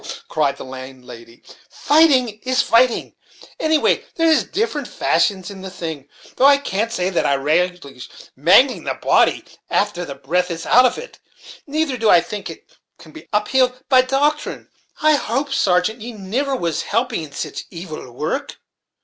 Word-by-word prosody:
cried 150 -3 0
the - - -9
landlady, 130 -3 -11 0.3
"fighting 265 -8 +3
is 255 +2 +1
fighting 235 +1 +2 0.5
anyway, 315 -1 +2
and - - -21
there 330 -1 +2
is 320 -1 +4
different 440 +5 -3
fashions 195 -2 0
in 195 -1 -10
the 190 - -7
thing; 160 -6 -7 0.3
though 260 - +4
I 285 0 +6
can't 225 -5 -2
say 185 -4 -1
that 175 - 0
I 140 - +2
relish 175 +6 0 0.6
mangling 180 - +4
a - - -1
body - - +2 0.2
after 200 -4 0
the 140 -5 -7
breath 175 +7 -1
is 165 -1 -5
out 250 +2 +6
of 250 - -4
it; - - -10 0.5
neither 295 -2 -1
do 225 -2 +1
I 175 - +7
think 205 +4 -6
it - - -11 0.3
can - - -15
be 320 - -13
uphild 250 +4 +1
by 260 -2 +6
doctrine. 285 +4 -1 0.3
I 310 0 +5
hope, 270 +3 -2
sargeant, 210 -2 +1
ye 240 +2 -7
niver 235 +8 -2
was 170 - -2
helping 230 -2 -1
in 155 -2 -9
sich 140 - -6
evil 165 -7 -9
worrek." 160 - -4
210 Hz, 165 wpm, -19 LUFS, 170-265 Hz, 0.6 s, I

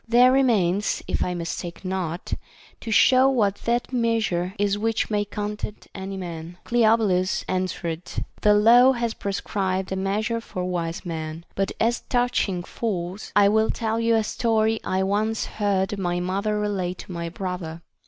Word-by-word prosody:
There 245 +2 +6
remains, 210 -8 +2
if - - 0
I 180 - -2
mistake 170 +2 -5
not, 185 -2 -3 0.5
to - - -7
show 255 +5 +6
what 210 -7 +2
that 240 +2 0
meas 230 -3 +1
ure 175 +2 -2
is 205 0 +1
which 225 +1 -1
may 205 -1 +1
content 210 +1 -5
any 195 0 -5
man. 170 -1 -7
Cleobulus 220 -5 +2
answered: 180 -3 -2 0.4
The 210 -1 +5
law 240 +5 +7
has 235 -2 -1
prescribed 190 -2 -2
a - - 0
measure 210 +4 -1
for 185 -5 -5
wise 170 -2 -3
men; 160 -1 -5
but 195 0 -1
as 235 +1 +2
touching 245 -7 +1
fools, 185 -2 -4
I 205 -1 +6
will 220 +1 +3
tell 225 0 -1
you 230 0 +3
a 220 - +2
story 220 0 +1
I 190 0 0
once 215 +3 0
heard 200 -1 -1
my 175 -1 0
mother 200 +4 -1
relate 190 -4 -2
to - - -11
my 170 -1 -4
brother. 175 -2 -5
200 Hz, 160 wpm, -24 LUFS, 180-225 Hz, 0.5 s, law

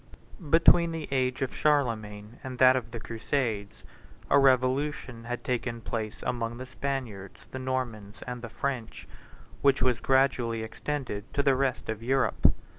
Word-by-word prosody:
Between 165 +1 +5
the 160 -2 -4
age 130 -1 +1
of 130 - -3
Charlemagne 115 -7 0
and 130 -1 -6
that 130 +1 +7
of 120 -3 -2
the 115 0 -6
crusades, 115 -3 -3 0.5
a 140 - +7
revolution 130 -2 +1
had 120 0 -4
taken 120 -2 -2
place 110 -2 -4
among 120 -1 -2
the 130 - -6
Spaniards, 130 -7 -5
the 130 - -5
Normans, 115 -6 -4
and 125 -1 -5
the 115 - -6
French, 125 -1 -4 0.5
which 140 -1 +4
was 125 -3 +3
gradually 125 -3 +2
extended 110 -3 -4
to 140 - +2
the 135 -2 +4
rest 130 -1 -1
of 110 0 -3
Europe. 135 +3 +3
125 Hz, 150 wpm, -28 LUFS, 115-135 Hz, 0.5 s, that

